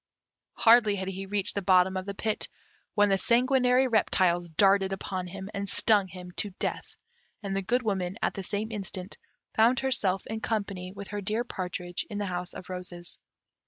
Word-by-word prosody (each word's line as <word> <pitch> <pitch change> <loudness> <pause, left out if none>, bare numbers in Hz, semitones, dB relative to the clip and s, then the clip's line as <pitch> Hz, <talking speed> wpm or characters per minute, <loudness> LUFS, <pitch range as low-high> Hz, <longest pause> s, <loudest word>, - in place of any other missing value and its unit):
Hardly 225 -3 +6
had 190 -1 -3
he 195 +1 -6
reached 200 0 -1
the 200 - -2
bottom 185 0 +4
of 185 +1 -3
the 200 - -4
pit, 215 +1 -1 0.5
when 205 -1 +4
the 195 -1 +2
sanguinary 250 +2 +3
reptiles 180 -6 +2
darted 195 +3 +4
upon 185 -1 -4
him, 190 +2 -7
and 200 -1 -3
stung 205 -4 +4
him 180 0 -10
to 205 - -1
death, - - -3 0.5
and 195 -1 -2
the 195 - 0
Good 245 +6 0
Woman, 190 -4 -1
at - - 0
the 195 - -5
same 205 +4 -3
instant, 195 -2 -6 0.4
found 235 +3 +4
herself 210 -8 0
in 220 0 -4
company 200 -5 -2
with 200 0 -9
her 205 0 -4
dear 215 +4 0
partridge 180 -5 -4
in 210 - -5
the 205 - -1
House 180 -1 -4
of 185 - -9
Roses. 180 -1 -7
195 Hz, 185 wpm, -28 LUFS, 185-215 Hz, 0.5 s, Hardly